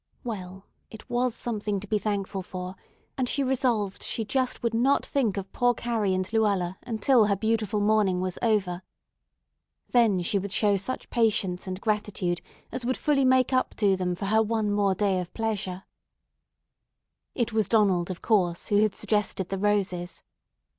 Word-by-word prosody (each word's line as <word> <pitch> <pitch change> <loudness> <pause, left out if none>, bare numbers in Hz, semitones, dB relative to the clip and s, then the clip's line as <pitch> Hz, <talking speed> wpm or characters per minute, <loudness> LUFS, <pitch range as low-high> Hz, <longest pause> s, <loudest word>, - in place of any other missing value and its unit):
Well, 190 -5 -6 0.2
it 220 - -12
was 245 -1 +1
something 210 -3 -2
to 200 - -8
be 210 +1 +1
thankful 200 -2 -2
for, 185 0 -7 0.4
and 250 -1 +1
she 280 - +1
resolved 245 -7 0
she 225 - -2
just 255 +3 -1
would 235 -1 0
not 255 +5 +2
think 235 -8 0
of 195 -1 -5
poor 245 0 +2
Carrie 220 -6 0
and 185 0 -1
Luella 200 -5 +1
until 230 0 +3
her 200 - +2
beautiful 220 0 0
morning 205 -3 +2
was 185 -1 -3
over. 200 -6 +1 1.1
Then 215 -7 +3
she 200 +3 +1
would 195 0 -5
show 205 0 +3
such 200 +7 -4
patience 205 -6 +1
and 185 0 -4
gratitude 205 -5 -1 0.3
as 255 - -3
would 255 +2 -1
fully 285 -3 +2
make 260 0 +3
up 255 - +1
to 200 -3 +3
them 180 -1 -1
for 190 - -5
her 220 +3 +3
one 220 -1 0
more 200 -2 +2
day 195 -1 +1
of 180 -1 -5
pleasure. 200 -4 -2 1.5
It 235 -3 -1
was 220 -3 +1
Donald, 195 -6 +3
of 185 - -6
course, 180 -6 +1
who 205 - +3
had 215 -2 +1
suggested 210 -3 -1
the 195 - -3
roses. 190 -3 -1
210 Hz, 170 wpm, -27 LUFS, 190-230 Hz, 1.5 s, until